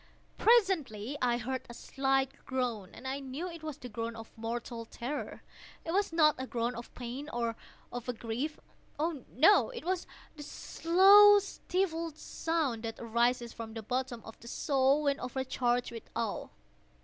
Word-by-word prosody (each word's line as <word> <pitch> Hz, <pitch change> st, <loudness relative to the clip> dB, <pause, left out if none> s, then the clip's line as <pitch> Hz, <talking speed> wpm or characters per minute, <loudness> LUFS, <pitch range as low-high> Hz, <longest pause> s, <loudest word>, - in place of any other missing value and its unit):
Presently 320 Hz, -, +3 dB
I 240 Hz, -1 st, +2 dB
heard 255 Hz, +2 st, -3 dB
a 235 Hz, -, -8 dB
slight 270 Hz, 0 st, 0 dB
groan, 245 Hz, -7 st, -2 dB
and 265 Hz, -, -8 dB
I 270 Hz, +1 st, -2 dB
knew 275 Hz, +6 st, -5 dB
it 335 Hz, -2 st, -8 dB
was 310 Hz, -3 st, -5 dB
the 250 Hz, -, -8 dB
groan 230 Hz, 0 st, -4 dB
of 225 Hz, 0 st, -11 dB
mortal 230 Hz, +1 st, -4 dB
terror. 250 Hz, +6 st, -5 dB, 0.4 s
It 330 Hz, -, -2 dB
was 395 Hz, +1 st, +1 dB
not 310 Hz, -2 st, +5 dB
a 260 Hz, -, -4 dB
groan 235 Hz, 0 st, -1 dB
of 235 Hz, +1 st, -8 dB
pain 255 Hz, +4 st, -6 dB
or 235 Hz, -4 st, -1 dB, 0.4 s
of 245 Hz, 0 st, -6 dB
grief—oh, 290 Hz, +4 st, -4 dB
no!—it 415 Hz, -, +4 dB
was 365 Hz, 0 st, -1 dB, 0.3 s
the 300 Hz, +2 st, -9 dB
low 405 Hz, +4 st, +9 dB
stifled 350 Hz, -5 st, -2 dB
sound 315 Hz, -9 st, -1 dB
that 225 Hz, -1 st, -5 dB
arises 235 Hz, +1 st, +1 dB
from 225 Hz, -1 st, -8 dB
the 225 Hz, -, -5 dB
bottom 250 Hz, 0 st, -2 dB
of 225 Hz, -, -11 dB
the 235 Hz, -, -13 dB
soul 275 Hz, +3 st, +2 dB
when 280 Hz, -1 st, +1 dB
overcharged 250 Hz, -1 st, -1 dB
with 230 Hz, -1 st, -9 dB
awe. 225 Hz, -2 st, -2 dB
260 Hz, 155 wpm, -31 LUFS, 235-315 Hz, 0.4 s, low